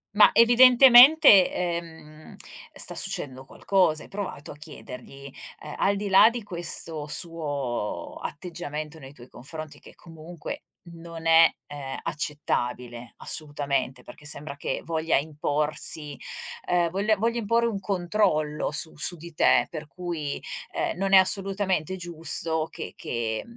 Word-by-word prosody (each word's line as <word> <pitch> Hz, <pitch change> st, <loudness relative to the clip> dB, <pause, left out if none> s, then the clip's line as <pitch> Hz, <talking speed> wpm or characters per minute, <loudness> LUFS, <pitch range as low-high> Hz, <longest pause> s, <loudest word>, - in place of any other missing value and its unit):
Ma 210 Hz, -, +8 dB
evidentemente, 245 Hz, -, +8 dB
ehm, 165 Hz, -3 st, -6 dB, 0.4 s
sta -, -, -1 dB
succedendo 130 Hz, -1 st, -3 dB
qualcosa, 175 Hz, -4 st, +1 dB
hai -, -, -15 dB
provato 195 Hz, -7 st, -6 dB
a -, -, -10 dB
chiedergli? 140 Hz, -1 st, -11 dB, 0.3 s
Ehm, 150 Hz, -, -8 dB
al 200 Hz, +1 st, +2 dB
di 205 Hz, +1 st, -4 dB
là 195 Hz, +3 st, +7 dB
di 235 Hz, -1 st, -6 dB
questo 170 Hz, -5 st, -3 dB
suo 145 Hz, -, -4 dB
atteggiamento 155 Hz, -2 st, -6 dB
nei 135 Hz, -2 st, -11 dB
tuoi 120 Hz, -3 st, -15 dB
confronti 155 Hz, +5 st, -9 dB
che -, -, -16 dB
comunque 165 Hz, -1 st, -9 dB, 0.2 s
non 165 Hz, -1 st, -10 dB
è 165 Hz, 0 st, +7 dB, 0.2 s
ehm 145 Hz, -2 st, -7 dB
accettabile, 125 Hz, -5 st, -3 dB
assolutamente, 140 Hz, -4 st, -3 dB
perché 120 Hz, +5 st, -14 dB
sembra 150 Hz, -1 st, -5 dB
che -, -, -3 dB
voglia 160 Hz, -1 st, 0 dB
imporsi, 150 Hz, 0 st, -2 dB, 0.5 s
ehm, 175 Hz, -1 st, +2 dB
voglia 205 Hz, +4 st, +1 dB
voglia 230 Hz, +3 st, -1 dB
imporre 230 Hz, +2 st, +1 dB
un 210 Hz, -4 st, -3 dB
controllo 175 Hz, -5 st, 0 dB
su 160 Hz, +2 st, -2 dB
su 175 Hz, +4 st, +1 dB
di 170 Hz, +1 st, -11 dB
te, 120 Hz, -5 st, +3 dB
per 155 Hz, -2 st, -7 dB
cui 165 Hz, -3 st, -5 dB, 0.3 s
ehm, -, -, -2 dB
non 195 Hz, +1 st, -1 dB
è -, -, +10 dB
assolutamente 190 Hz, -2 st, +1 dB
giusto 165 Hz, -2 st, -2 dB
che -, -, -8 dB
che 110 Hz, -2 st, -3 dB
160 Hz, 130 wpm, -25 LUFS, 145-190 Hz, 0.5 s, è